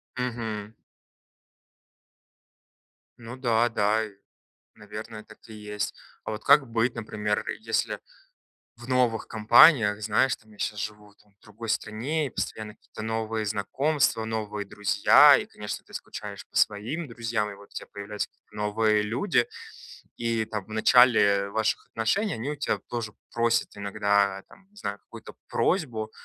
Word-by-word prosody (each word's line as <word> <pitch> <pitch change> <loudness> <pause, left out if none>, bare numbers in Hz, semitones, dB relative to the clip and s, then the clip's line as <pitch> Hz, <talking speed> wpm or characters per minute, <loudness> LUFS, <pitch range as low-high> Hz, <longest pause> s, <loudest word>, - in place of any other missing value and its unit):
Мгм. 115 -4 -4 2.5
Ну 120 +1 -8
да, 120 -3 +2
да, 110 0 +1
и 105 - -11 0.6
наверное, 105 +1 -9
так 110 - -16
и 110 - -10
есть. 105 -1 -4 0.3
А - - -4
вот 105 0 -6
как 140 -3 +5
быть, 115 +1 +1
например, 105 -2 -2 0.2
если 110 0 -1 0.8
в 120 +1 -12
новых 125 -3 +1
компаниях, 110 0 +6
знаешь, 110 +5 +2
там, 110 0 -22
я 105 - -19
щас 105 - -2
живу 105 0 -6
там 105 -1 -29
в 100 - -53
другой 110 +2 -10
стране, 125 +9 -1
и - - -6
постоянно 110 -2 -4
какие-то - - -11
новые 110 0 -2
знакомства, 110 +5 0
новые 105 -2 -3
друзья, 105 0 +6
и, - - -3
конечно, - - -7
ты - - -20
скучаешь - - -7
по - - -15
своим 120 +11 0
друзьям, 115 -3 -2
и - - -8
вот 100 0 -15
у - - -22
тебя - - -7
появляются 105 0 -4
какие-то 105 - -22
новые 105 0 +2
люди. 120 - +1 0.7
И, 115 -1 0
там, 105 -3 -4
в - - -19
начале 110 -3 +5
ваших 110 +1 -1
отношений, 195 - 0
они 115 +6 -4
у 150 - -6
тебя 145 - -1
тоже 115 -3 -4 0.2
просят 115 -1 +1
иногда, 100 -1 +1
там, 195 - -19
не 205 - -30
знаю, 100 - -4
какую-то - - -12
просьбу, 120 - 0
110 Hz, 150 wpm, -27 LUFS, 105-120 Hz, 2.5 s, компаниях